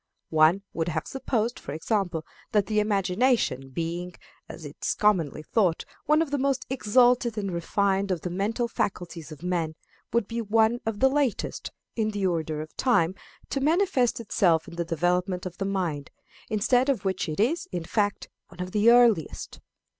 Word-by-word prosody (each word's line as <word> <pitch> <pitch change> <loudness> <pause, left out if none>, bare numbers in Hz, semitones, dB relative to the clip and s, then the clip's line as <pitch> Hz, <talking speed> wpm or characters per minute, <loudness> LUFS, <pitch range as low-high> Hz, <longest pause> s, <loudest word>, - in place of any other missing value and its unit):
One 160 +5 +4
would 165 0 -2
have 160 -2 -2
supposed, 240 -3 -2
for 140 - -7
example, 170 -1 -1 0.3
that 205 -2 +3
the 215 -1 +1
imagination 205 - +1
being, 170 +5 -4 0.3
as - - -9
is - - -3
commonly 170 -8 +1
thought, 180 -3 +1 0.2
one 305 +2 +4
of 300 - -8
the 285 - 0
most 270 -1 0
exalted 245 -1 +3
and 200 -2 -2
refined 195 +3 0
of 180 -4 -1
the 180 - -4
mental 215 +6 -1
faculties 175 -8 -4
of 155 +1 -10
man 170 -3 -1 0.4
would 235 -3 +1
be 230 0 -3
one 225 +2 +2
of 225 0 -2
the 265 - +7
latest, 270 -4 -1 0.3
in 220 -2 0
the 205 -2 -2
order 160 -4 -1
of 155 - -10
time, 185 -10 +2 0.4
to 275 - -1
manifest 300 -6 +2
itself 175 -7 +2
in 170 - -10
the 170 0 -2
development 180 +3 0
of 180 -1 -7
the 195 - -1
mind; 175 -8 -2 0.4
instead 245 +5 +2
of 265 -7 0
which 190 -3 -1
it 155 - -4
is, 270 +11 +1
in 175 -3 -3
fact, 205 +4 -1 0.2
one 175 - -17
of 180 0 -4
the 210 +3 +4
earliest. 235 -9 +3
195 Hz, 175 wpm, -26 LUFS, 170-235 Hz, 0.4 s, the